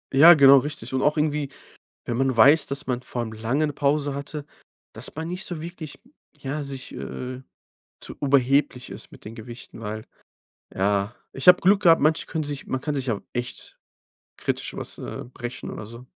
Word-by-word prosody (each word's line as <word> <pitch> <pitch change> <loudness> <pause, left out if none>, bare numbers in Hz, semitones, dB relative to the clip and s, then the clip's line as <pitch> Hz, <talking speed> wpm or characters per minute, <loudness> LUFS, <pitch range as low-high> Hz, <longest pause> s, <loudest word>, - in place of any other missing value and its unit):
Ja, 165 +5 +10
genau, 140 -1 +8
richtig. 135 -3 -3
Und 130 - +1
auch 150 +3 +2
irgendwie, 150 -2 0 0.6
wenn 120 - -2
man 135 -2 +1
weiß, 140 +6 +7
dass 140 +1 -4
man 125 -1 -1
vor 125 -1 -3
allem 110 - -5
langen 120 +8 0
'ne 145 - -4
Pause 145 0 0
hatte, 145 +1 -5 0.5
dass - - -7
man 160 +1 -4
nicht 180 +4 -4
so 165 -3 -5
wirklich, 165 -3 -8 0.4
ja, 145 +2 -3
sich 135 -2 -7
äh, 130 0 -6 0.6
zu - - -3
überheblich 135 -1 +2
ist - - -9
mit - - -15
den 105 - -7
Gewichten, 115 0 -10
weil 110 0 -5 0.7
ja 100 +2 +1 0.2
Ich 135 +7 +5
habe 180 - +8
Glück 195 +2 +4
gehabt, 165 -2 +6
manche 155 +2 +2
können 155 -2 -3
sich 145 -1 -5
man 130 - -1
kann 150 +2 -3
sich 135 -2 -2
ja 110 -4 0
echt 120 0 -5 0.6
kritisch - - -3
was, - - -6
äh, - - -6
brechen 120 0 -6
oder 105 - -7
so. 115 +2 -11
140 Hz, 190 wpm, -24 LUFS, 120-150 Hz, 0.7 s, Ja